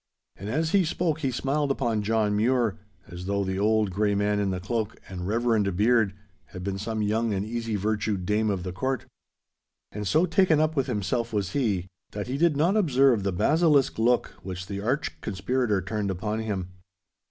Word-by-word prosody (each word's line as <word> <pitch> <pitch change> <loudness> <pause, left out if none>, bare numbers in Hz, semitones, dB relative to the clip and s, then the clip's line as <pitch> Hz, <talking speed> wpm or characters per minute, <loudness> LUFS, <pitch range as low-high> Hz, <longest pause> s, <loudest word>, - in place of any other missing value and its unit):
And 100 +3 -7
as 160 +6 0
he 195 -2 +4
spoke 160 -1 -1
he 140 -4 0
smiled 140 +3 -1
upon 120 -6 0
John 105 -1 +1
Mure, 115 -1 +1 0.3
as 90 +1 -8
though 100 0 0
the 95 0 -2
old 105 -1 +2
grey 105 +2 +1
man 105 0 +1
in 100 -1 0
the 95 -1 -2
cloak 110 +3 -3
and 90 -1 -6
reverend 110 -3 +1
beard 110 -2 +3 0.3
had 90 +4 -9
been 95 0 -3
some 110 +1 -2
young 110 +1 0
and 95 +1 -2
easy 115 0 -3
virtued 105 -2 -1
dame 105 +2 +1
of 95 -3 -1
the 90 - -4
Court. 130 +4 -2 0.9
And 105 -1 -4
so 160 - +3
taken 165 -2 +3
up 155 0 +1
with 135 -1 +1
himself 115 +1 -1
was 100 -4 -1
he, 105 -10 0 0.3
that 105 0 -3
he 130 +3 -3
did 165 -3 +3
not 170 +7 +3
observe 135 - +4
the 100 0 -1
basilisk 150 - +3
look 120 +2 +2
which 90 0 -6
the 100 0 -5
arch 130 +8 -2
conspirator 110 0 0
turned 105 +1 -2
upon 105 +4 -2
him. 100 -5 -3
110 Hz, 190 wpm, -26 LUFS, 100-130 Hz, 0.9 s, he